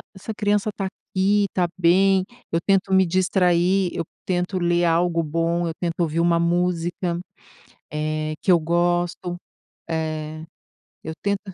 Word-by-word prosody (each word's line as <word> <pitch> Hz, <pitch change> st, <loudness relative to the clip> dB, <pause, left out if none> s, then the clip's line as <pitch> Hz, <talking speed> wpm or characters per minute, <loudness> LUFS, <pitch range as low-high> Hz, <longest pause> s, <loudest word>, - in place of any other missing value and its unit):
essa 205 Hz, +3 st, -6 dB
criança 205 Hz, 0 st, +1 dB
tá 195 Hz, -, -3 dB
aqui, 200 Hz, +1 st, 0 dB
está 180 Hz, -2 st, 0 dB
bem," 185 Hz, +2 st, +4 dB, 0.3 s
eu 165 Hz, -, +1 dB
tento 195 Hz, -1 st, +2 dB
me 190 Hz, 0 st, +5 dB
distrair, 180 Hz, +1 st, +2 dB
eu 170 Hz, -, -2 dB, 0.2 s
tento 180 Hz, +1 st, -1 dB
ler 175 Hz, 0 st, +2 dB
algo 170 Hz, 0 st, +2 dB
bom, 165 Hz, +2 st, 0 dB
eu 165 Hz, -, -3 dB
tento 175 Hz, 0 st, -2 dB
ouvir 165 Hz, -1 st, 0 dB
uma 170 Hz, 0 st, +3 dB
música, 175 Hz, 0 st, 0 dB, 0.7 s
eh, 155 Hz, 0 st, -2 dB
que 190 Hz, -, +3 dB
eu 175 Hz, -, +6 dB
gosto, 175 Hz, +1 st, 0 dB, 0.5 s
eh, 155 Hz, -1 st, -3 dB, 0.6 s
eu 160 Hz, -, -5 dB
tento 200 Hz, -1 st, +1 dB
175 Hz, 140 wpm, -23 LUFS, 165-185 Hz, 0.7 s, eu